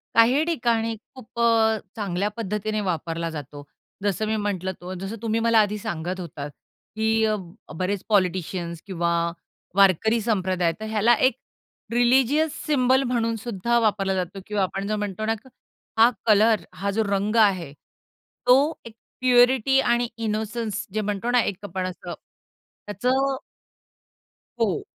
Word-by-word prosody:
काही 245 +6 +5
ठिकाणी 235 -8 0 0.2
खूप 235 -2 -11
अ, 225 -1 +4 0.2
चांगल्या 200 -1 -1
पद्धतीने 215 0 -2
वापरला 165 -2 -2
जातो. 145 -2 -8 0.4
जसं 205 +1 0
मी 220 - 0
म्हंटलं 200 -3 -2
तो 180 +1 -6
जसं 195 +4 -5
तुम्ही 225 0 0
मला 230 0 +4
आधी 210 0 -1
सांगत 175 -1 -4
होतात 150 -4 -6 0.4
की 220 0 +2
अ, 215 -1 +1 0.4
बरेच 190 +1 -1
पॉलिटिशियन्स 180 -4 0
किंवा 170 -3 -1 0.6
वारकरी 200 +4 +4
संप्रदाय, 185 -6 +1
तर 220 - -5
ह्याला 220 +2 +3
एक 265 - -1 0.6
रिलिजियस 265 +6 +3
सिम्बॉल 265 -2 +3
म्हणून 235 -3 0
सुद्धा 235 +1 -1
वापरला 200 -4 +1
जातो 185 +1 -3
किंवा 210 -2 0
आपण 195 +1 -3
जो 215 - 0
म्हणतो 210 0 -3
ना, 225 - +1 0.7
हा 230 - +8 0.2
कलर, 215 0 +4
हा 195 +2 -2
जो 220 +3 +1
रंग 200 +2 0
आहे, 190 -9 +3 0.7
तो 250 0 +7 0.3
एक 230 -1 -11 0.3
प्युरिटी 255 +1 +4
आणि 240 -2 +2
इनोसन्स 220 0 -3
जे 215 - 0
म्हणतो 210 +3 -2
ना, 245 0 +4
एक 200 - -2
आपण 190 -1 -3
असं 185 - -7 0.7
त्याचं 205 +4 -2
अ 270 +1 +1 1.2
हो. 210 -6 +1
215 Hz, 140 wpm, -24 LUFS, 190-230 Hz, 1.2 s, हा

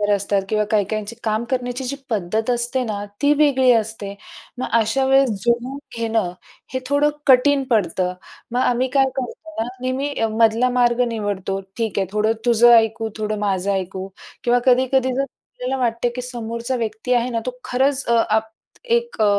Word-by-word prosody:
असतात 200 0 0
किंवा 215 -1 +2
काही-काहींची 215 +1 -1
काम 220 +1 0
करण्याची 250 0 -2
जी 280 +3 -3
पद्धत 215 +2 -1
असते 245 +1 0
ना, 205 -3 -3 0.2
ती 290 +1 +5
वेगळी 270 -4 +4
असते. 220 -3 -1 0.4
मग 255 - -3
अशा 225 +5 +1
वेळेस 270 -1 +4
जुळूवून 240 +5 -1 0.2
घेणं, 225 -5 0 0.4
हे 260 - 0
थोडं 285 +1 +3 0.2
कठीण 275 +2 +5
पडतं. 180 -3 +1 0.4
मग 245 - 0
आम्ही 255 0 +2
काय 270 -1 +5
करतो 290 +5 -5
ना, 230 - -2
नेहमी 265 +3 -2 0.3
मधला 230 +3 +4
मार्ग 245 0 +2
निवडतो. 205 -4 -3 0.2
ठीक 220 -4 -1
आहे, 190 - 0
थोडं 215 +1 +1
तुझं 240 0 +6
ऐकू, 225 0 +2
थोडं 215 0 -2
माझं 200 -1 0
ऐकू 190 0 -3 0.4
किंवा 245 0 +3
कधी-कधी 260 0 +3
जर 275 - +1
आपल्याला 265 -1 -6
वाटते, 235 0 0
की 250 +1 -6
समोरचा 235 0 -4
व्यक्ती 230 +1 -2
आहे 240 +1 +1
ना 230 -2 -1
तो 250 0 -5
खरंच 265 +2 +1
अ, 235 - +3 0.2
आप 220 +1 +1 0.4
एक 475 - 0
अ, - - +5
235 Hz, 165 wpm, -21 LUFS, 215-255 Hz, 0.4 s, तुझं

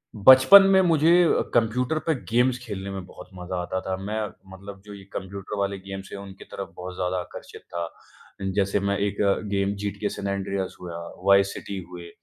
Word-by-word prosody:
बचपन 130 - +9
में 190 0 +6
मुझे 165 -2 +4
अ, 165 - +3
कंप्यूटर 125 +6 +1
पे 160 - +4 0.2
गेम्स 125 +1 +3
खेलने 100 -3 -5
में 95 -2 -6
बहुत - - -13
मज़ा 90 0 -6
आता 95 +1 -3
था। 95 - -3
मैं 105 +3 -3 0.3
मतलब 95 0 -11
जो 105 - -10
ये 100 - -11
कंप्यूटर 100 +1 -6
वाले 100 0 -1
गेम्स 95 0 -8
हैं, 100 - -6
उनकी 95 -1 -11
तरफ 100 - -8
बहुत 90 0 -7
ज़्यादा 90 0 -1
आकर्षित 90 - -10
था। 85 -1 -3 0.7
जैसे 100 0 +1
मैं 100 0 0
एक 100 0 -1
अ, 100 -1 +4 0.2
गेम 100 0 +1
जीटीए 100 0 -2
सैन 100 - -5
एंड्रीआस 100 -1 -3
हुआ, 85 -2 -6 0.3
वाईस 100 0 +5
सिटी 100 - -6
हुए। 85 -1 -9
100 Hz, 190 wpm, -25 LUFS, 95-105 Hz, 0.7 s, बचपन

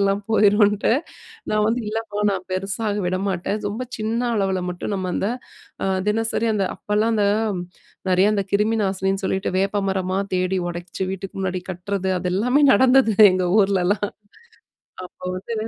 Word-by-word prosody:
வேர்லாம் 200 +1 +1
போயிரும்னுட்டு," 210 0 +4 0.6
நான் 215 0 +2
வந்து 235 +3 +1
"இல்லைம்மா 215 -1 -4
நான் 185 -1 -4
பெருசாக 200 +3 -2
விடமாட்டேன். 190 +2 -2
ரொம்ப 230 +5 -4
சின்ன 220 +2 -1 0.2
அளவுல 190 -2 0
மட்டும்" 180 +3 -4
நம்ம 185 -2 -2
அந்த 200 - 0 0.8
தினசரி 225 +1 0
அந்த 200 - +1
அப்பலாம் 210 +2 0
அந்த 210 -2 +2 0.8
நெறைய 185 +3 +4
அந்த 200 - +1
கிருமி 210 +3 +2
நாசினின்னு 195 0 -1
சொல்லிவிட்டு 190 0 -1
வேப்பமரமா 195 -1 0 0.2
தேடி 185 +1 0
உடைச்சு 175 +2 -6
வீட்டுக்கு 195 0 -7
முன்னாடி 185 -1 -2
கட்டுறது 190 +1 -3
அது 180 +1 -3
எல்லாமே 250 +8 +2
நடந்தது 255 0 +5 0.2
எங்க 185 0 0 0.2
ஊரிலலாம். 195 +1 +1 1.0
அப்ப 180 - -15
வந்து 195 +5 -5
200 Hz, 140 wpm, -22 LUFS, 185-215 Hz, 1.0 s, நடந்தது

